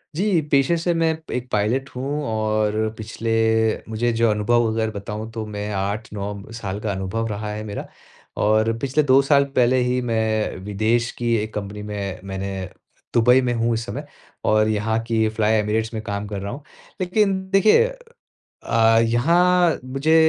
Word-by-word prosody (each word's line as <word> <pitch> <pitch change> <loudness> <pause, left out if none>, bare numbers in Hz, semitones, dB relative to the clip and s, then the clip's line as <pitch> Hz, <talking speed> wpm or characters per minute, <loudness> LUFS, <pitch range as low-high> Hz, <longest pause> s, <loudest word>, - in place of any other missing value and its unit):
जी, 190 -2 +2
पेशे 140 +4 +4
से 170 +1 0
मैं 165 -1 +1
एक 125 0 -4
पायलट 120 +6 0
हूँ 140 +4 -2
और 110 -1 0
पिछले 115 +1 -4 0.6
मुझे 120 +2 0
जो 115 0 +2
अनुभव 115 +3 +2
अगर 110 0 0
बताऊँ 105 +1 -6
तो 110 -1 -5
मैं 105 0 -5
8-9 100 +1 -4
साल 100 -1 -4
का 105 - -2
अनुभव 95 +4 -2
रहा 105 0 -4
है 105 - -5
मेरा। 105 -1 -6 0.6
और 110 +1 +3
पिछले 140 +4 +1
2 135 0 +5
साल 140 0 +4
पहले 125 +1 +4
ही 125 +1 +1
मैं 110 -4 0
विदेश 110 +4 0
की 120 -1 +1
एक 110 +1 -4
कंपनी 105 0 -5
में 100 -2 -4
मैंने 95 0 -4 0.6
दुबई 125 +2 +5
में 125 -1 0
हूँ 115 0 +1
इस 115 0 -2
समय - - -6 0.4
और 110 0 +3
यहाँ 110 +1 0
की 110 -1 +2
फ्लाई 110 0 +1
एमिरेट्स 110 +2 -1
में 110 - -3
काम 105 -1 -4
कर 100 -1 -4
रहा 100 +1 -4
हूँ। 145 - -9 0.4
लेकिन 195 +1 +2
देखिए 210 - +5 0.8
अ, 115 0 +4
यहाँ 170 +9 +3
मुझे 135 +5 +1
110 Hz, 165 wpm, -22 LUFS, 105-130 Hz, 0.8 s, 2